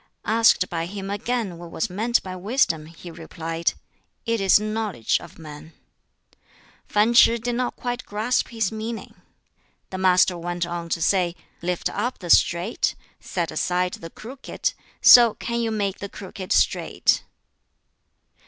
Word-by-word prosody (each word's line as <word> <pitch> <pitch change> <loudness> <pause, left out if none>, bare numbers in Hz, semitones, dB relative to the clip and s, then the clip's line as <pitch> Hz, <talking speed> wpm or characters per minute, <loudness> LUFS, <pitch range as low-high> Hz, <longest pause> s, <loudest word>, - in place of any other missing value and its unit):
Asked 225 -4 +4
by 165 -1 -3
him 195 +1 -6
again 205 -4 -3
what 170 -1 -9
was 160 - -2
meant 225 +6 0
by 185 -1 -6
wisdom, 185 - 0
he 170 +1 -11
replied, 165 0 -3 0.5
"It 230 -2 0
is 195 +1 +5
knowledge 215 - -1
of 170 - -13
man." 155 0 -11 1.1
Fan 210 +3 +2
Ch'i 235 0 +6
did 240 +2 -2
not 245 +1 -2
quite 245 0 -4
grasp 220 +4 -1
his 225 -4 -2
meaning. 220 +1 -6 0.8
The 185 - -5
Master 185 -1 +3
went 175 0 -3
on 170 -1 -5
to 165 0 -1
say, 180 -2 +1 0.3
"Lift 180 0 -1
up 240 +5 -3
the 175 -2 -3
straight, 175 +6 +2 0.2
set 170 -4 -3
aside 180 +3 0
the 165 - -8
crooked, 250 +9 -5 0.3
so 235 -3 +8
can 235 0 -3
you 230 - 0
make 200 -3 -2
the 200 - -6
crooked 190 -1 -9
straight." - - +2
190 Hz, 145 wpm, -23 LUFS, 170-225 Hz, 1.1 s, so